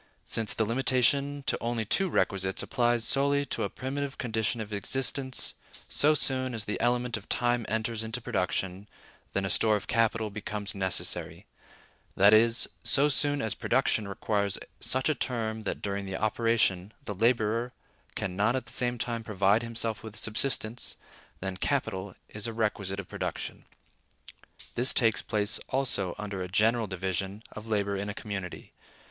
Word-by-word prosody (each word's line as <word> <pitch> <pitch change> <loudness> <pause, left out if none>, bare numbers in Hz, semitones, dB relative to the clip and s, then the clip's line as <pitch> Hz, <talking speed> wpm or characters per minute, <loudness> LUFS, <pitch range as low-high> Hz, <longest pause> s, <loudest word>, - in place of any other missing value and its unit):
Since 110 -2 0
the 110 - +1
limitation 135 +4 +2
to - - 0
only 115 -1 -1
two 190 - +2
requisites 95 - 0
applies 120 -2 +1
solely 140 +1 +2
to - - -3
a 100 - 0
primitive 135 +4 -4
condition 110 -1 -1
of 110 -1 -5
existence, 130 +4 0 0.3
so 150 +1 +4
soon 130 -3 +2
as 110 -2 -3
the 105 - -3
element 120 0 +1
of 105 - -13
time 120 -2 +1
enters 110 0 -1
into 110 +2 -3
production, 95 -3 -2 0.5
then 95 0 0
a - - -1
store 110 +3 +3
of 105 - -3
capital 115 -1 +1
becomes 105 0 -4
necessary; 95 -2 0 0.7
that 100 +2 +6
is, 115 +2 +5 0.2
so 145 +2 +4
soon 145 0 +2
as 110 -2 0
production 115 -3 +1
requires 100 0 0 0.2
such 130 +1 +1
a 155 - +3
term 115 -4 -2
that - - -5
during 100 -1 -3
the 95 0 -3
operation 110 -3 +1
the 105 - -3
laborer 115 +2 +1 0.4
can 95 -3 -3
not 105 +5 +2
at 130 -2 -2
the 120 - -6
same 125 -1 +1
time 115 0 -2
provide 100 0 +2
himself 115 -1 -1
with 110 -1 -9
subsistence, 115 +1 +1 0.4
then 95 -1 -4
capital 95 0 -1
is 105 +1 -3
a 115 - -4
requisite 105 -3 -1
of 95 - -6
production. - - -5 1.1
This 125 +3 +3
takes 115 -3 +3
place 105 -1 0
also 120 -9 +1
under 105 -2 -5
any 90 - -3
general 110 +4 +2
division 95 +2 -3
of 110 +1 -9
labor 100 -2 0
in 100 +1 -3
a 105 - -5
community. 100 -4 -6
110 Hz, 160 wpm, -29 LUFS, 100-120 Hz, 1.1 s, that